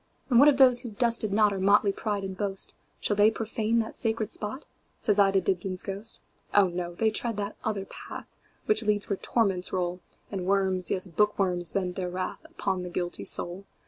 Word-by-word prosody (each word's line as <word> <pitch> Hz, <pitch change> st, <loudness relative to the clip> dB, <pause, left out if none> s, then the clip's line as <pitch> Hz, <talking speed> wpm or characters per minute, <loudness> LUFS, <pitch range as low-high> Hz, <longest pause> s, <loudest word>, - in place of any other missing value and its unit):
And 235 Hz, -, +6 dB
what 285 Hz, -, +8 dB
of 290 Hz, -3 st, +5 dB
those 255 Hz, -3 st, +6 dB
who 240 Hz, -, -6 dB
've 205 Hz, -, -15 dB
dusted 230 Hz, -3 st, +3 dB
notOur 205 Hz, -1 st, +2 dB
motley 200 Hz, +1 st, +4 dB
pride 205 Hz, 0 st, -3 dB
and 190 Hz, -1 st, -5 dB
boast,—Shall 200 Hz, +1 st, -3 dB
they 205 Hz, +1 st, +5 dB
profane 225 Hz, 0 st, -1 dB
that 220 Hz, -, -7 dB
sacred 220 Hz, -2 st, -1 dB
spot?"Says 210 Hz, -2 st, -2 dB
I 200 Hz, -1 st, +6 dB
to 195 Hz, 0 st, +2 dB
Dibdin's 185 Hz, 0 st, -1 dB
ghost."Oh, 200 Hz, -1 st, -1 dB
no! 175 Hz, 0 st, -5 dB
they 220 Hz, +3 st, +1 dB
tread 230 Hz, 0 st, -2 dB
that 205 Hz, 0 st, -4 dB
other 205 Hz, -3 st, -2 dB
path, -, -, -9 dB, 0.4 s
Which 215 Hz, +1 st, +4 dB
leads 210 Hz, -2 st, 0 dB
where 200 Hz, -, 0 dB
torments 195 Hz, -6 st, 0 dB
roll, 180 Hz, -1 st, -2 dB, 0.3 s
And 185 Hz, -3 st, -4 dB
worms, 190 Hz, -2 st, +1 dB
yes, 185 Hz, 0 st, -1 dB
bookworms, 180 Hz, -1 st, +1 dB
vent 180 Hz, -1 st, -2 dB
their 180 Hz, -1 st, -2 dB
wrathUpon 190 Hz, -, -4 dB
the 180 Hz, -, -6 dB
guilty 175 Hz, 0 st, -4 dB
soul. 180 Hz, +3 st, 0 dB
200 Hz, 180 wpm, -27 LUFS, 185-220 Hz, 0.4 s, what